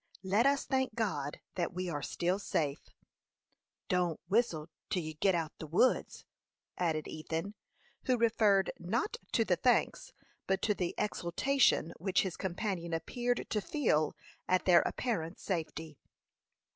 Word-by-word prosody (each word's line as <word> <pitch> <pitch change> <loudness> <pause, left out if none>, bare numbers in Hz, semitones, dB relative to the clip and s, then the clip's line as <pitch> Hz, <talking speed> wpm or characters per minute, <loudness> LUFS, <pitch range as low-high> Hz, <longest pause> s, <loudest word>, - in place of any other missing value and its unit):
"Let 205 +7 +3
us 280 0 +2
thank 260 -4 0
God 150 -11 -2
that 175 0 -2
we 185 0 -2
are 150 -4 -3
still 180 +6 -1
safe." 150 -6 -2 1.0
"Don't 180 -4 +1
whistle 190 -7 +1 0.2
till 180 - 0
you 155 0 -5
get 180 +4 +2
out 160 -2 -1
o' - - -54
the 160 - -6
woods," 175 +11 +2 0.5
added 160 -4 -1
Ethan, 160 +5 -4 0.5
who 255 -2 +3
referred, 215 -4 +3
not 230 - -1 0.2
to - - +3
the - - +2
thanks, - - +1 0.4
but 190 0 0
to 210 - +3
the 180 -3 -2
exultation 205 - +2
which 190 +2 +2
his 190 -3 -3
companion 180 -2 -2
appeared 245 +9 -1
to 210 - +1
feel 155 - +1 0.3
at 185 0 +2
their 180 -2 +7
apparent 180 -8 -2
safety. 160 -4 -4
185 Hz, 145 wpm, -32 LUFS, 165-220 Hz, 1.0 s, their